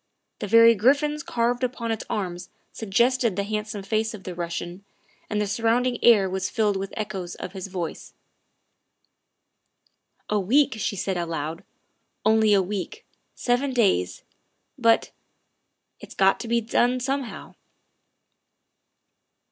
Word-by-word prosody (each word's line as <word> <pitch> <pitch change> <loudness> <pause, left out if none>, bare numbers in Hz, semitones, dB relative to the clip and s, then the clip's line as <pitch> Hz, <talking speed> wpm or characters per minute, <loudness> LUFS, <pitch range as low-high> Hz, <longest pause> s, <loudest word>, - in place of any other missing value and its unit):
The 210 - -4
very 230 +2 +7
griffins 285 +7 +2
carved 245 -6 -1
upon 240 -2 -2
its 220 - -3
arms 180 -3 -4 0.2
suggested 235 +1 +1
the 200 - -1
handsome 210 0 -4
face 220 +2 -1
of 195 - -12
the 180 - -6
Russian, 175 +2 -5 0.5
and 210 - -1
the 210 - +1
surrounding 230 +4 0
air 210 -5 +6
was 190 0 -2
filled 215 -4 +1
with 195 0 -3
echoes 195 -5 -4
of - - -7
his 190 -1 -6
voice. 180 -4 -6 2.1
''A 210 -2 0
week," 275 +8 +3
she 205 - -1
said 190 0 -2
aloud, 165 -1 -4 0.3
" - - -47
only 220 0 +4
a 195 -2 +4
week, 210 - -5 0.3
seven 255 +2 0
days. 95 - +1 0.5
But 230 -1 +2 0.9
it - - -12
's - - -25
got 195 0 +3
to 235 - -6
be 235 0 +1
done 240 +3 +1
somehow. 270 0 -4
215 Hz, 135 wpm, -24 LUFS, 190-240 Hz, 2.1 s, very